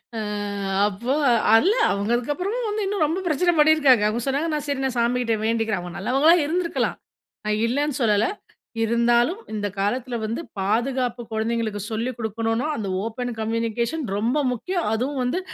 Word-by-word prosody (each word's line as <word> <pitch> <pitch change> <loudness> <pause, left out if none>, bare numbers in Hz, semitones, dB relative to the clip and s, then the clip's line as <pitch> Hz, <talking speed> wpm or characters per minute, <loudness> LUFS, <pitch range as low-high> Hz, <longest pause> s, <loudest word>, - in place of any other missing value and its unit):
அ - - -2 0.7
அப்போ 220 +6 -2 0.4
இல்ல 355 - +5 0.2
அவங்க 200 +2 -1
அதுக்கப்புறமும் 365 - -2
வந்து 420 0 -1
இன்னும் 390 -3 0
ரொம்ப 325 +5 -1
பிரச்சனை 350 +3 +2
பண்ணி 305 +1 +7
இருக்காங்க. 265 -8 +5
அவங்க 225 +3 -1
சொன்னாங்க 285 +5 0
நான் 300 -1 -2
சரி 280 -2 -1
நான் 260 -1 -2
சாமிகிட்ட 235 -1 +1
வேண்டிக்கிறேன். 225 -3 0
அவங்க 175 -1 -8
நல்லவங்களா 270 +10 +4
இருந்திருக்கலாம். 335 +3 -1 0.5
நா 215 - 0
இல்லன்னு 280 +4 0
சொல்லல, 210 -2 +3 0.6
இருந்தாலும், 235 - +2
இந்த 205 -1 -2
காலத்துல 240 +5 -1
வந்து 225 +7 -3 0.2
பாதுகாப்பு 240 +4 0
குழந்தைகளுக்கு 220 -1 -1
சொல்லிக் 230 +3 -2
குடுக்கணுன்னோ 225 +4 -1
அந்த 210 -3 -3 0.2
ஓபன் 245 +2 -4
கம்யூனிகேஷன் 230 +6 -1
ரொம்ப 235 +7 0
முக்கியம். 350 - -2
அதுவும் 260 +4 -1
வந்து 250 +9 0
240 Hz, 150 wpm, -23 LUFS, 225-290 Hz, 0.7 s, பண்ணி